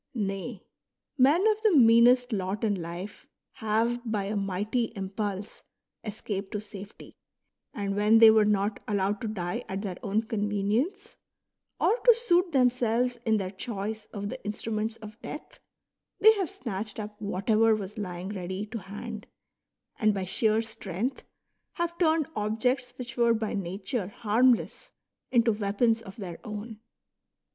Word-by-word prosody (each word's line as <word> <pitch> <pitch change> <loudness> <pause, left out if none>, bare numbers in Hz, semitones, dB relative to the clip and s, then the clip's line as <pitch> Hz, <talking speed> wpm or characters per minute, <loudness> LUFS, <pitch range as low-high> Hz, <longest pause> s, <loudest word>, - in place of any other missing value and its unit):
Nay, 195 0 -3 0.5
men 290 +8 +4
of 430 0 +2
the 425 -8 +4
meanest 245 +1 +6
lot 195 +2 -2
in 215 -2 +2
life 175 +5 -7 0.2
have 225 +3 0
by 220 -4 -1
a 205 +2 -3
mighty 200 +4 0
impulse 200 +1 -4 0.4
escaped 205 -2 -5
to 210 - -1
safety, 205 -1 -11 0.5
and 200 -2 -3
when 210 +2 +5
they 225 -1 +9
were 220 -1 +5
not 205 0 +1
allowed 200 0 0
to 225 - -2
die 180 -5 -3
at 195 +2 -3
their 185 -4 -4
own 210 +2 0
convenience, 220 - -1 0.6
or 470 - +3
to 480 -2 +6
suit 360 -6 +2
themselves 245 -2 +2
in 220 -1 +4
their 190 -2 -3
choice 210 +1 -5
of 205 -1 -6
the - - -7
instruments 215 +1 -2
of 215 0 -12
death, 300 - -8 0.6
they 440 +1 +8
have 385 -7 -2
snatched 215 -3 -5
up 210 0 -7
whatever 215 +3 +2
was 210 +1 -6
lying 180 -1 -5
ready 190 0 -4
to 220 +2 -6
hand, 210 +3 -8 0.7
and 215 -2 +3
by 190 -1 -2
sheer 220 +4 +1
strength 220 +2 -4 0.5
have 340 -1 -2
turned 320 -3 +3
objects 240 +4 0
which 250 -1 -7
were 235 -1 +4
by 220 -1 -2
nature 195 +3 -3
harmless 235 +4 +1 0.4
into 235 -2 +4
weapons 220 +2 +1
of 195 -4 -11
their 180 -6 -7
own. 215 +1 -7
215 Hz, 145 wpm, -28 LUFS, 200-240 Hz, 0.7 s, they